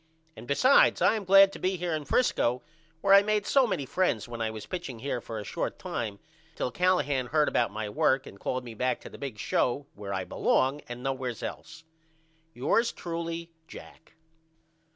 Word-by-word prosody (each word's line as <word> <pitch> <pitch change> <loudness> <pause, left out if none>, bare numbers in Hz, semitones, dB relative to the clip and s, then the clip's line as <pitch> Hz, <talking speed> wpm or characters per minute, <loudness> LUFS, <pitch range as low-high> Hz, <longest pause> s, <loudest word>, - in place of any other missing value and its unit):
And 120 - -11
besides 255 - +5
I - - +4
am 215 -3 -3
glad 195 +1 +7
to - - -8
be 185 +1 0
here 175 -1 -2
in 155 -2 -3
Frisco 125 - +1 0.4
where 195 - +4
I 200 - +9
made 210 0 0
so 270 +1 +4
many 170 -10 -2
friends 135 - 0
when 120 -1 -6
I 110 - 0
was 110 -1 -7
pitching 175 -9 -6
here 125 0 -3
for 115 - -7
a 105 - -5
short - - -4
time 110 -4 -4 0.4
till 125 - -2
Callahan 145 -8 +1
heard 150 +3 +2
about 120 - +1
my 110 +1 -4
work 135 +4 +1
and 100 - -12
called 130 +4 -2
me 120 -2 -8
back 125 +3 -1
to - - -11
the - - -11
big 135 -6 -6
show 125 +6 0
where 100 -1 -7
I 95 -1 -2
belong 135 +9 +1
at - - -29
and 120 +1 -7
nowheres 130 -3 -3
else. 170 0 -7 0.7
Yours 230 - +2
truly, 170 0 -5 0.2
JACK. 160 - -13
140 Hz, 195 wpm, -28 LUFS, 120-180 Hz, 0.7 s, I